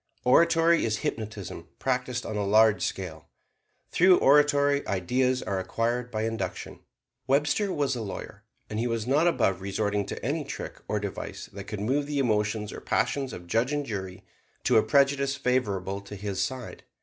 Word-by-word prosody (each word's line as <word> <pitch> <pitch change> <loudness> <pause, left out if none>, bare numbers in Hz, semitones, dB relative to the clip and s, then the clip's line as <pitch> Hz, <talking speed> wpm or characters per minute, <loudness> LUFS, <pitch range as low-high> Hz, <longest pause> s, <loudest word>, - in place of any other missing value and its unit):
Oratory 165 +5 +4
is 110 -1 0
hypnotism 105 -6 -5
practised 125 -1 -1
on 110 - -4
a 105 - 0
large 105 -1 +4
scale. 85 -3 -4 0.6
Through 180 +1 +6
oratory 145 0 +4
ideas 125 +7 +1
are 95 -1 -2
acquired 120 +5 -1
by 110 -2 -2
induction. 115 0 -4 0.5
Webster 145 +9 +2
was 140 -5 0
a 120 - -4
lawyer; 100 -3 -7 0.2
and 105 - -4
he 120 - 0
was 115 -2 -2
not 145 +7 +3
above 95 - +1
resorting 100 +1 -1
to - - -6
any - - -1
trick - - -7
or - - 0
device - - -6
that 100 0 -7
could 105 -1 -5
move 140 +6 0
the 145 -1 -2
emotions 105 -4 0
or - - -8
passions 135 -2 0
of 90 - -8
judge 115 +9 +1
and 145 -1 -1
jury 95 -5 -5 0.4
to - - +4
a - - +7
prejudice 140 0 +2
favorable 100 -8 -1
to 100 +1 -9
his 100 -1 -3
side. 130 -3 -4
115 Hz, 170 wpm, -27 LUFS, 100-140 Hz, 0.6 s, a